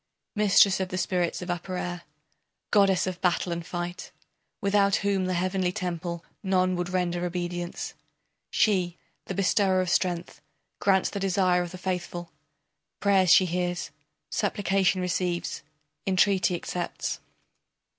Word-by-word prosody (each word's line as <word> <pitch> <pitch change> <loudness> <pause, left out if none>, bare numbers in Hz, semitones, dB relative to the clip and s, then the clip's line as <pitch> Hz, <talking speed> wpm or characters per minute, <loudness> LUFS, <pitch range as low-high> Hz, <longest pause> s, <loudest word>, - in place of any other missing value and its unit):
Mistress 200 -2 +5
of 190 -1 -2
the 185 - -3
spirits 180 -1 0
of 180 - -3
upper 180 +1 -4
air, 175 -1 -4 0.7
Goddess 195 -3 +4
of 185 -1 -4
battle 180 0 +1
and 170 0 -3
fight, 175 +1 -5 0.5
Without 200 0 +3
whom 195 -2 +1
the 185 - 0
heavenly 185 0 0
temple 175 -3 -4 0.2
None 185 -2 +2
would 175 0 -2
render 175 -1 -1
obedience, 175 0 -3 0.6
She, 185 -5 +2 0.3
the 190 - -4
bestower 190 0 +3
of 185 -2 0
strength, 175 -2 -1 0.4
grants 190 -2 +3
the 200 - -3
desire 185 -2 +2
of 175 - -3
the 185 - -8
faithful, 175 -2 -4 0.7
Prayers 195 -3 +3
she 185 +2 +7
hears, 175 0 -2 0.4
supplication 190 -1 +1
receives, 180 -1 -1 0.5
entreaty 190 -1 +3
accepts. 175 0 -3
180 Hz, 130 wpm, -27 LUFS, 175-190 Hz, 0.7 s, she